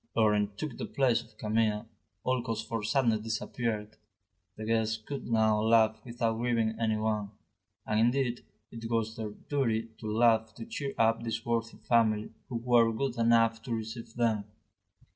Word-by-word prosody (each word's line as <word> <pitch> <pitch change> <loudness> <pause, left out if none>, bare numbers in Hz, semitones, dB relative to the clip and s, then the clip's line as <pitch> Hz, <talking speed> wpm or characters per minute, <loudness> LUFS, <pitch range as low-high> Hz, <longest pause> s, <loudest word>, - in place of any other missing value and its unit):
Laurent 105 -2 +2
took 150 -2 -5
the - - -2
place 130 -4 +2
of - - -19
Camille, 110 -1 +1 0.4
all 130 -1 +1
cause 115 -2 -3
for 115 -1 -3
sadness 110 0 +2
disappeared, 110 0 -3 0.6
the 110 - -5
guests 110 0 +1
could 130 +5 -7
now 110 -2 +3
laugh 110 0 +4
without 115 -2 -1
grieving 115 -2 +1
anyone; 110 -2 0 0.6
and, 105 - +1
indeed, 120 +1 +1 0.3
it 115 -1 -7
was 110 -1 0
their 110 -3 -4
duty 115 -1 -1
to 110 - -6
laugh 110 0 +3
to - - -7
cheer 150 -12 -4
up 115 0 +3
this 115 0 -3
worthy 115 -1 -1
family 110 -3 +2 0.2
who 125 - -5
were 115 -1 +4
good 125 +2 -2
enough 115 -1 +3
to 115 0 -3
receive 115 +1 -6
them. 110 -4 +1
115 Hz, 160 wpm, -30 LUFS, 110-120 Hz, 0.6 s, laugh